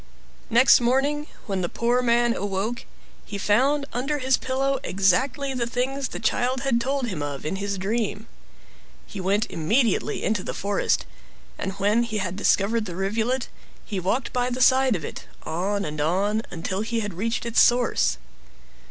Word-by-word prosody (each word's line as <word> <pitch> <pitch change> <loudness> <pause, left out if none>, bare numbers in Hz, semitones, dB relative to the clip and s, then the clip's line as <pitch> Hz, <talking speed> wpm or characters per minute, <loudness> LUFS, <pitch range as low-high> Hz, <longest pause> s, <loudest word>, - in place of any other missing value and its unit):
Next 240 +2 +6
morning, 280 +5 +1 0.2
when 195 -3 -2
the 175 - -1
poor 240 +2 +1
man 240 -1 +2
awoke, 205 +4 -3 0.4
he 205 - -6
found 265 +9 +2
under 275 +5 -1
his 260 -1 +2
pillow 270 +1 -1
exactly 265 +8 +1
the 240 -2 -1
things 265 +3 -1
the - - -7
child 245 +3 0
mad 235 -3 +2
told 270 +1 -1
him 185 -10 -4
of 145 -1 -5
in 175 +5 -2
his 200 0 -3
dream. 210 +2 -2 0.8
He 200 - -7
went 200 +4 +1
immediately 220 - +1
into 210 -3 0
the - - -5
forest, 200 0 0 0.5
and 195 - -3
when 205 +4 +2
he 225 -2 -2
had 185 -3 -2
discovered 210 +2 +2
the 175 -4 -6
rivulet 225 +7 -1 0.4
he 200 -3 -3
walked 195 +8 -1
by 245 0 +1
the 250 0 -3
side 260 -1 +5
of 160 -5 -4
it, - - -8 0.2
on 200 +5 -2
and 150 0 -4
on, 195 +7 +1
until 185 +3 -3
he 225 0 -2
reached 210 +5 -2
its 235 -1 +4
source. 245 0 +3
225 Hz, 165 wpm, -24 LUFS, 195-250 Hz, 0.8 s, Next